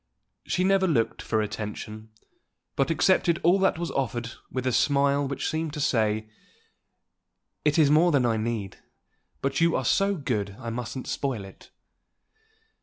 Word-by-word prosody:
She 180 - +1
never 190 0 +3
looked 120 -10 0
for 110 -1 0
attention, 110 +1 -6 0.7
but 135 - +1
accepted 170 +1 +3
all 180 +4 +4
that 190 -3 +2
was 170 0 -3
offered 120 -3 -2 0.2
with 130 0 -3
a 130 - +2
smile 140 +3 +2
which 140 - -3
seemed 160 -1 -2
to 150 - -5
say, 110 -5 +1 1.4
"It 150 0 +2
is 150 -3 +5
more 165 +3 +5
than 140 -5 +3
I 115 -2 +1
need, 110 -3 -3 0.6
but 135 +3 0
you 165 0 +3
are 130 - -1
so 195 +9 +2
good 110 - -2
I 120 -3 -6
mustn't 125 +2 -5
spoil 125 -8 -3
it." 95 - -15
135 Hz, 155 wpm, -26 LUFS, 115-160 Hz, 1.4 s, is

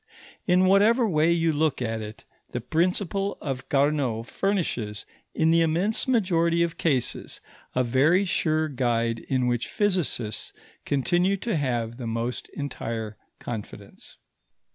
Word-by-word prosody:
In 185 0 +4
whatever 215 +5 +4
way 160 -3 +3
you 165 -1 +2
look 155 -1 +1
at 115 -2 -2
it, 105 0 -9 0.2
the 120 - -3
principle 180 - -1
of 135 -3 -5
Carnot 140 -5 +1
furnishes, 125 - -2 0.3
in 160 0 +3
the 165 0 +4
immense 175 +10 +1
majority 170 -8 +2
of 170 -1 -2
cases, 135 -7 -1 0.4
a 130 - +3
very 145 +11 +3
sure 155 -4 +1
guide 115 -4 0
in 130 +1 -1
which 120 -1 0
physicists 175 - -1 0.3
continue 175 +8 +1
to 225 +1 -2
have 120 -5 -1
the 125 -3 -5
most 115 +2 -3
entire 115 -6 -4 0.2
confidence. 110 -4 -8
150 Hz, 130 wpm, -26 LUFS, 120-180 Hz, 0.4 s, In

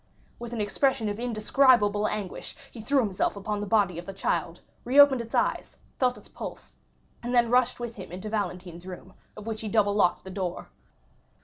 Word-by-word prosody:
With 240 0 -7
an 235 - -4
expression 220 +1 +1
of 205 +1 -4
indescribable 220 -2 +3
anguish 205 -4 -5 0.2
he 235 - -11
threw 275 +4 +2
himself 200 -4 0
upon 205 +1 -3
the 205 - -4
body 195 -5 +2
of 175 - -10
the 195 - -5
child, 170 -2 -2 0.2
reopened 270 0 +6
its 230 0 -6
eyes, - - 0 0.2
felt 250 -1 +2
its - - -15
pulse, - - -9 0.5
and 245 +1 -2
then 235 -1 +4
rushed 250 0 +3
with 240 -2 -6
him 190 -4 -9
into 185 +4 -6
Valentine's 180 -4 -4
room, 185 +1 -9 0.2
of 210 - -9
which 220 -1 -4
he 220 - -4
double 205 -2 +3
locked 200 -4 +2
the 190 - -8
door. 185 -2 -4
210 Hz, 190 wpm, -27 LUFS, 190-240 Hz, 0.5 s, reopened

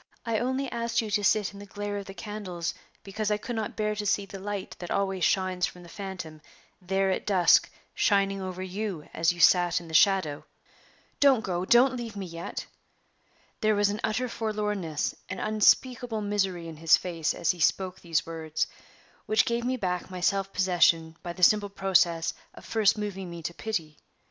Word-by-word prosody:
I 225 -2 0
only 260 +3 -1
asked 235 0 -1
you 220 -2 -2
to 205 0 +1
sit 210 0 +2
in 200 - -11
the 205 - -10
glare 205 0 -4
of 200 - -6
the 195 - -9
candles 200 -6 -4 0.3
because 210 +2 -3
I 210 - +2
could 240 +3 -5
not 220 -1 -3
bear 215 -1 0
to 210 0 -4
see 200 0 +1
the 195 0 -9
light 200 0 -5
that 175 - -7
always 195 -2 -1
shines 185 -2 +2
from 180 - -12
the 170 - -13
phantom 185 -6 -7 0.4
there 190 +1 +1
at - - -1
dusk 185 -4 +5 0.2
shining 195 -1 +2
over 185 0 -5
you 190 -3 -4
as 165 +1 +2
you 175 - -9
sat 175 0 +5
in 170 - -12
the 160 - -10
shadow. 160 -5 +3 0.8
Don't 270 -5 +5
go 180 -3 -2
don't 250 +5 +5
leave 235 -3 -6
me 200 -1 -4
yet!" 170 -1 -6 0.9
There 215 0 +2
was 205 0 +3
an 210 +2 -4
utter 220 +4 0
forlornness, 210 -8 -2 0.2
an - - -4
unspeakable 225 +2 +2
misery 195 -4 -1
in 160 -1 -8
his 165 +1 +5
face 165 -3 -2
as - - +2
he 180 - -9
spoke 185 +3 +1
these 165 -2 -1
words, 160 -1 -2 0.6
which 215 +1 +3
gave 235 0 -1
me 255 +1 0
back 180 -5 -2
my 185 -1 -6
self 195 +2 +1
possession 170 -4 +2
by 175 - -5
the 180 - -6
simple 205 +2 +5
process 180 -4 +2 0.2
of - - -13
first 220 -2 +2
moving 195 -3 -4
me 170 -1 -8
to 170 - -3
pity. 165 -7 -4
195 Hz, 195 wpm, -28 LUFS, 175-215 Hz, 0.9 s, dusk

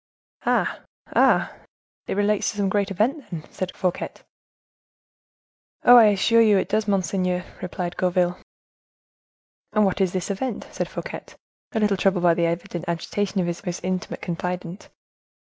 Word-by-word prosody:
"Ah! - - +1 0.4
ah! - - +4 0.5
it - - -2
relates 205 0 +2
to 210 - -6
some 200 -1 +1
great 200 0 +1
event, 230 - 0
then?" 165 -4 -5
asked 185 -1 -5
Fouquet. 180 -2 -1 1.7
"Oh! 245 - +9
I 235 -2 +9
assure 215 +3 +4
you 215 -3 +5
it 190 - -1
does, 215 +1 +1
monseigneur," 185 -2 0 0.2
replied 180 -1 -4
Gourville. 180 0 +1 1.3
"And 215 -1 +4
what 195 +1 0
is 185 -2 +2
this 185 +1 -2
event?" 225 +4 -3
said - - -3
Fouquet, - - -6 0.5
a 220 - +1
little 210 -2 +2
troubled 185 -2 +2
by 170 -1 +6
the 170 0 +1
evident 175 +1 -4
agitation 190 +3 -1
of - - 0
his 175 +2 -4
most 180 -2 -4
intimate 185 0 -3
confidant. 180 +1 -4
190 Hz, 150 wpm, -24 LUFS, 180-205 Hz, 1.7 s, Oh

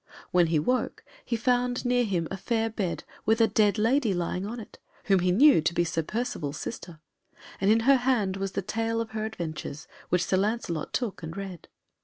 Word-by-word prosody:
When 175 -2 +4
he 160 -1 +2
woke 250 +12 -1 0.2
he 240 - -2
found 245 +2 +1
near 245 0 +3
him 180 -7 -1
a - - -2
fair 225 +3 -1
bed, 195 -6 -3 0.2
with 220 +1 +2
a 225 - +6
dead 210 -1 +2
lady 230 -1 +2
lying 180 +2 -2
on 235 +3 -5
it, 220 - -12 0.2
whom 195 -2 +3
he 180 0 +2
knew 265 - +6
to 170 +2 0
be 175 - +3
Sir 165 -1 -1
Percivale's 160 - -3
sister, 175 -8 -7 0.6
and 195 - +2
in 225 +1 +5
her 270 +3 +5
hand 240 -7 +1
was 195 -1 -3
the 195 - -2
tale 225 +3 -1
of 230 -1 -3
her 215 0 -2
adventures, 160 -8 -6 0.2
which 180 0 +2
Sir 185 - +1
Lancelot 195 -6 -1
took 235 -8 -2
and 160 +3 -7
read. 190 -4 -7
205 Hz, 205 wpm, -27 LUFS, 175-230 Hz, 0.6 s, a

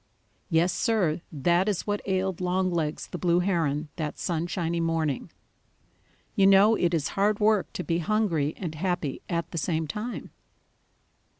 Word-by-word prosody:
Yes, 170 +1 +3
Sir, 180 -7 +1
that 175 +6 +2
is 195 -4 -2
what 205 0 -1
ailed 190 -1 -1
Longlegs 180 -4 0
the 180 - -6
Blue 175 0 +2
Heron 160 -5 0
that 155 -3 -3
sunshiny 170 0 -2
morning. 165 -4 -1 1.1
You 195 - +5
know 195 +3 +7
it 175 -5 +1
is 150 -4 -1
hard 205 +1 +1
work 210 -2 +2
to 180 - -4
be 170 -1 0
hungry 170 -6 0
and 170 -5 -4
happy 170 -3 -2
at 170 -1 -2
the 170 - -2
same 160 0 -1
time. 210 +10 -5
175 Hz, 145 wpm, -27 LUFS, 160-195 Hz, 1.1 s, know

